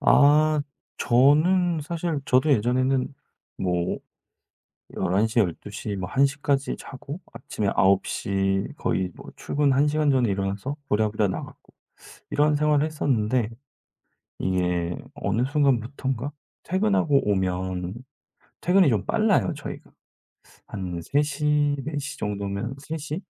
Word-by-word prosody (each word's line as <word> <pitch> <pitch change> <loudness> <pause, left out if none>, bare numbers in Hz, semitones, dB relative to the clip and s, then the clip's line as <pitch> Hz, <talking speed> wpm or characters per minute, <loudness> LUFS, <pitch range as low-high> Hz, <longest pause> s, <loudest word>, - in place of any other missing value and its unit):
아, 150 +1 +5 0.4
저는 155 +7 +4
사실 165 -1 -2
저도 130 +4 +3
예전에는 130 +3 +1 0.4
뭐 90 -1 -1 1.0
11:00 110 +5 +2
12:00 100 +2 -3
막 90 +4 -6
1:00 140 +1 +3
까지 140 -1 0
자고 140 +5 -8
아침에 100 -2 -3
9:00 95 0 +1
거의 95 -1 0
뭐 - - -11
출근 145 -1 +1
1 140 +3 +3
시간 150 -1 +2
전에 125 -5 +2
일어나서 100 +8 -2
부랴부랴 105 -1 +1
나갔고 - - -7 0.6
이런 150 +1 +3
생활을 150 0 +3
했었는데 125 -7 0 0.9
이게 90 -2 0 0.2
어느 105 +5 -1
순간부터인가 135 -1 0 0.3
퇴근하고 185 - +2
오면 95 -1 -1 0.7
퇴근이 180 -1 +4
좀 105 -4 0
빨라요, 215 -5 +2
저희가. 150 - -8 0.8
한 90 -4 -5
3:00, 145 - 0 0.4
4:00 145 -2 -4
정도면 100 +4 -3
3:00? 155 +3 -5
130 Hz, 205 characters per minute, -25 LUFS, 100-150 Hz, 1.0 s, 아